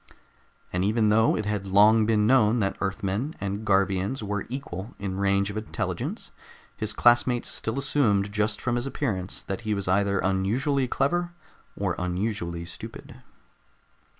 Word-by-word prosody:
And 90 +1 0
even 110 +2 +2
though 110 +1 +4
it 110 - -2
had 105 -2 -2
long 105 +3 +5
been 105 -2 +3
known 115 -2 +4
that 100 -4 0
Earthmen 100 +8 -2
and 100 +2 -3
Garvians 100 +3 +1
were 105 -1 -3
equal 115 -6 -6
in 95 -1 -4
range 100 0 +2
of 105 - -6
intelligence, 110 - -4 0.4
his 110 -1 -2
classmates 120 +2 +3
still 110 +3 -3
assumed 115 -8 +1
just 105 +1 0
from 120 -1 -1
his 120 +3 -2
appearance 100 -10 -3
that 95 +3 -4
he 110 -2 -1
was 100 -2 -3
either 100 +1 +2
unusually 115 +10 +1
clever 175 +8 0 0.4
or 95 -3 0
unusually 90 -2 -2
stupid. 85 - -10
105 Hz, 150 wpm, -26 LUFS, 95-120 Hz, 0.4 s, long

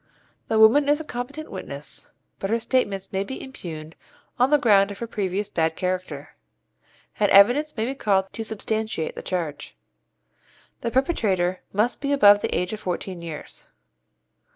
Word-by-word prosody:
The 220 - +1
woman 235 +7 +6
is 295 +1 +3
a - - -5
competent 280 +3 -6
witness, 150 -6 -7 0.3
but 195 - -3
her 230 +2 +1
statements 205 -6 -1
may 190 +1 0
be 265 +6 -6
impugned 160 -11 -8 0.4
on 250 +2 +4
the 295 - +5
ground 205 -7 +4
of 200 - -7
her 235 - -4
previous 205 -2 -2
bad 160 -5 0
character, 185 0 -4 0.9
and 205 -1 +3
evidence 245 +9 +5
may 220 - 0
be 260 - -2
called 195 -7 +1
to 225 - -4
substantiate 220 -5 -3
the - - -7
charge. 160 -5 -4 1.0
The 235 - -2
perpetrator 200 - +1
must 215 +5 0
be 280 0 -1
above 205 -7 +6
the - - -1
age 180 +3 -2
of 215 - -5
fourteen 180 -1 -4
years. 165 -3 -9
205 Hz, 160 wpm, -24 LUFS, 185-245 Hz, 1.0 s, woman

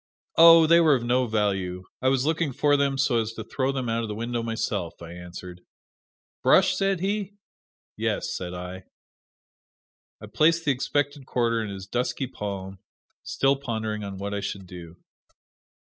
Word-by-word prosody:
"Oh, 165 0 +9
they 170 +2 +6
were 155 -4 +5
of 120 - -2
no 125 +1 +1
value 95 -4 -1 0.2
I 130 - +1
was 130 0 +2
looking 155 -2 0
for 145 +3 +3
them 140 -1 +1
so 135 -3 +2
as 110 0 -4
to 110 - -6
throw 130 +4 -1
them 130 -3 -3
out 115 0 0
of 115 - -3
the 105 - -5
window 120 +2 -3
myself," 100 -6 -3
I 85 -1 -9
answered. 90 0 -10 0.8
"Brush?" - - +4
said 195 -2 0
he. 200 0 -2 0.6
"Yes," - - -1
said 90 -1 -5
I. 90 +1 -7 1.3
I - - -9
placed 165 +1 +2
the 145 - +3
expected 145 +1 -2
quarter 115 -2 +1
in 105 - -5
his 95 -1 -7
dusky 120 +5 -2
palm, 100 -5 -6 0.4
still 135 +1 +1
pondering 110 -5 -3
on 100 -1 -6
what 100 +1 -4
I 100 - -1
should 100 -1 -5
do. 85 -2 -11
115 Hz, 170 wpm, -25 LUFS, 100-140 Hz, 1.3 s, Oh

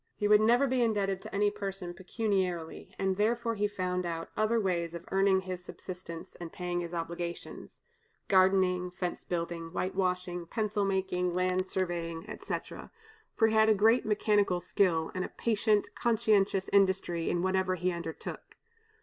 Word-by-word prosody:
He 205 - 0
would 210 0 +6
never 240 +5 +4
be 260 -1 +1
indebted 200 -4 +1
to - - -8
any 205 +1 +3
person 195 -3 -5
pecuniarily, 185 -3 -2
and 190 -1 0
therefore 230 +2 +1
he 210 -1 0
found 185 -3 -2
out 165 -1 -4
other 215 +2 +2
ways 170 -4 -1
of 170 - -8
earning 195 0 +3
his 185 -1 -6
subsistence 180 -2 -8
and 170 -2 -7
paying 175 -1 -3
his 170 -1 -4
obligations, 170 0 -6 0.4
gardening, 185 -1 +3
fence 180 0 -4
building, 170 -1 -4
white 185 +2 -2
washing, 180 -2 -1
pencil 210 0 -1
making, 185 -2 0
land 185 0 +1
surveying, 170 -3 -3
etc., - - -6 0.5
for 225 -1 +4
he - - -1
had 220 -1 +5
great 225 +4 +4
mechanical 210 -3 +2
skill, 175 -2 +1
and 185 - -2
a - - -4
patient, 215 -2 +1
conscientious 210 -4 +2
industry 190 -4 +2
in 175 - 0
whatever 190 0 +1
he 180 +1 0
undertook. 170 -2 -7
185 Hz, 155 wpm, -30 LUFS, 175-205 Hz, 0.5 s, would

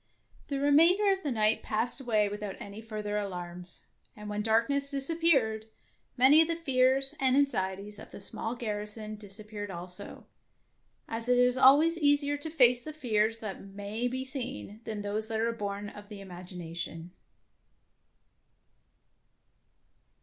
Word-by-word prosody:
The 280 -1 -3
remainder 335 +8 +4
of 385 - -5
the 295 - -3
night 215 -2 +2
passed 230 +5 -1
away 215 -5 +1
without 205 -1 -5
any 200 +2 -9
further 210 -2 -4
alarms, 180 -2 -7 0.3
and 210 0 -9
when 210 0 -2
darkness 230 +6 +1
disappeared, 275 -7 +2 0.5
many 270 +5 +7
of 325 - +3
the 335 - -1
fears 270 -3 +4
and 260 -1 +3
anxieties 205 -6 -1
of - - -11
the - - -11
small 225 +4 -3
garrison 215 -1 -5
disappeared 205 0 -9
also, 180 +2 -8 0.8
as 230 +2 -2
it 250 - +4
is 250 0 +4
always 295 +6 +5
easier 290 -1 +3
to 290 +3 -5
face 250 -6 +4
the 310 +4 -8
fears 225 -6 0
that 210 -3 -6
may 205 +4 -4
be 260 +1 -4
seen 260 -5 -4
than 215 -2 -5
those 210 +2 -2
that 220 -1 -3
are 230 +1 +1
born 205 -2 -5
of 205 0 -13
the 210 -2 -9
imagination. 175 -2 -8
220 Hz, 140 wpm, -29 LUFS, 205-270 Hz, 0.8 s, many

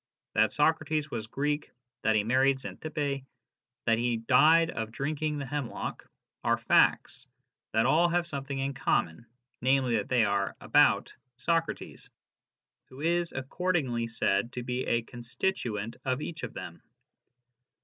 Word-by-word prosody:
That 110 +1 +3
Socrates 155 0 +1
was 110 -2 -4
Greek, 145 +5 -2 0.3
that 110 0 +2
he 105 - +3
married 130 +4 +3
Xantippe, 145 -1 -3 0.6
that 115 -1 +3
he 120 -1 +1
died 155 +8 +5
of 110 0 -4
drinking 150 +4 -2
the 140 - -4
hemlock, 140 -2 -5 0.3
are - - +2
facts - - +2 0.5
that 110 +1 +3
all 165 +6 +4
have 175 0 +1
something 140 -4 -4
in 135 +1 -1
common, 115 -6 -1 0.3
namely, 130 -2 +2
that 105 - -3
they 125 -3 +4
are 100 -1 0
" - - -45
about - - +3
" 125 -1 -51
Socrates, 165 -1 -1 0.8
who 130 - -13
is 170 +2 +1
accordingly 130 -4 -1
said 115 0 0
to 125 - -4
be 125 +1 -3
a 120 0 +1
con 120 +1 -10
stituent 115 - -2
of 130 0 0
each 160 +1 -6
of - - -6
them. - - -8
135 Hz, 150 wpm, -29 LUFS, 115-150 Hz, 0.8 s, died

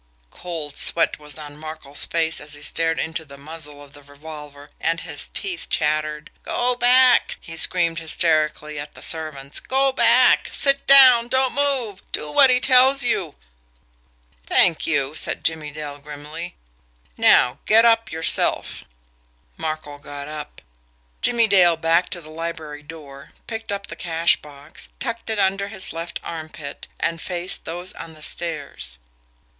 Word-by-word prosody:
Cold 160 -5 -6
sweat 165 -2 +3
was 150 0 -10
on 145 -1 -9
Markel's 155 -2 -3
face 165 -1 0
as 150 0 -7
he 145 - -9
stared 165 0 0
into 160 0 -3
the 140 -2 -13
muzzle 150 0 -4
of 140 0 -17
the 145 - -14
revolver, 145 0 -11
and 165 +1 -1
his - - -5
teeth 365 -4 -3
chattered. 150 0 -1
"Go 250 +1 0
back!" 250 +1 +4
he 165 - -10
screamed 170 0 +2
hysterically 155 -2 -1
at 145 +1 -8
the - - -6
servants. 150 -3 0
"Go 270 +1 +1
back! 260 - +4
Sit 275 0 +1
down! 255 -4 +8
Don't 260 +1 +1
move! 265 -8 0
Do 150 - -2
what 270 - +6
he 250 0 +5
tells 260 +1 +6
you!" 180 -10 -1 1.1
"Thank 170 -3 +3
you!" 145 -3 0
said - - -2
Jimmie 160 -2 -1
Dale 145 -1 -7
grimly. 150 +4 -8 0.6
"Now, 125 - +4
get 225 +2 +6
up 230 -1 +3
yourself!" 160 0 +1 0.7
Markel 155 -2 -5
got 145 0 -8
up. 150 -1 -9 0.6
Jimmie 235 -2 +3
Dale 180 -5 +4
backed 165 +2 +1
to 175 - -4
the 155 -1 -12
library 160 -2 -6
door, 145 -3 -12
picked 225 -2 -5
up 200 0 -4
the - - -9
cash 165 0 +2
box, 145 +1 -10
tucked 230 -3 -4
it 220 - -1
under 200 0 +1
his 195 -5 -5
left 165 +1 -5
armpit, 155 -3 -8
and 165 0 -1
faced 180 0 -1
those 175 +3 -4
on 160 -1 -10
the 155 - -12
stairs. 145 - -4
"Mr. - - -38
160 Hz, 155 wpm, -21 LUFS, 150-200 Hz, 1.1 s, down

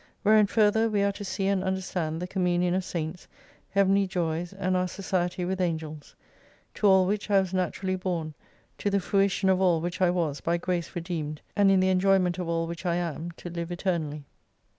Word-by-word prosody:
Wherein 215 -1 +5
further 220 +1 +3
we 205 -2 +1
are 200 - +2
to 205 +1 -8
see 195 0 -3
and 195 -1 +1
understand 185 -4 -2
the 180 - -4
communion 180 -1 +1
of 190 +1 0
Saints, 170 -1 -5 0.4
Heavenly 195 0 +3
joys, 170 -2 -2
and 190 -1 -1
our 185 0 +1
society 180 -1 -2
with 190 +1 -2
Angels. 160 -3 -4 0.6
To 210 - +1
all 190 -1 +6
which 205 +2 -2
I 200 -1 +5
was 190 -1 -2
naturally 185 +1 -1
born, 175 -4 -3 0.5
to 205 - 0
the 200 0 +2
fruition 195 0 +1
of 190 0 +3
all 175 -3 +3
which 175 +3 -4
I 180 - +5
was 165 -5 -1
by 170 +1 0
Grace 175 0 -3
redeemed, 165 -4 -4
and 205 -1 +4
in 190 -1 +4
the 185 - +3
enjoyment 185 -1 +2
of 175 -2 -3
all 165 0 0
which 170 +1 -7
I 175 -2 0
am 170 -1 -3
to 175 +1 -9
live 170 0 -5
eternally. 160 -5 -2
180 Hz, 200 wpm, -27 LUFS, 170-195 Hz, 0.6 s, all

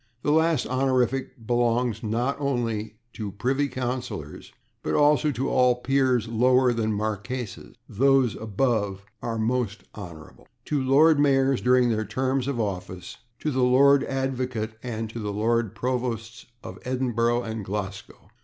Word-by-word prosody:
This 145 - +1
last 160 -2 +3
honorific 130 -2 0
belongs, 120 -1 +1
not 120 +5 -1
only 115 -6 -2 0.2
to 105 -3 -5
[Pg120] - - -23
privy 135 +6 +1
councillors, 125 - -5 0.3
but - - -2
also 150 +1 +4
to 135 -1 -2
all 125 -1 +3
peers 130 -2 +1
lower 125 +2 +3
than 110 -1 -1
marquesses 110 +3 -4
(those 135 0 +3
above 105 -3 -1 0.2
are 115 -1 -3
/Most 115 -1 -1
Hon./), 85 -6 -11 0.2
to 145 -2 0
Lord 145 +4 +5
Mayors 135 -2 +3
during 125 -1 +4
their 110 -1 0
terms 130 +5 -1
of 140 -4 -2
office, 90 -4 -4 0.2
to 155 - -1
the 130 -1 0
Lord 135 +2 +5
Advocate 130 -4 -2
and 115 -2 -4
to 115 - -6
the 105 -2 -3
Lord 110 +1 0
Provosts 120 -1 -3 0.2
of 95 +2 -9
Edinburgh 120 -2 0
and 110 -1 -5
Glasgow. 100 0 -6
120 Hz, 145 wpm, -25 LUFS, 110-130 Hz, 0.3 s, Lord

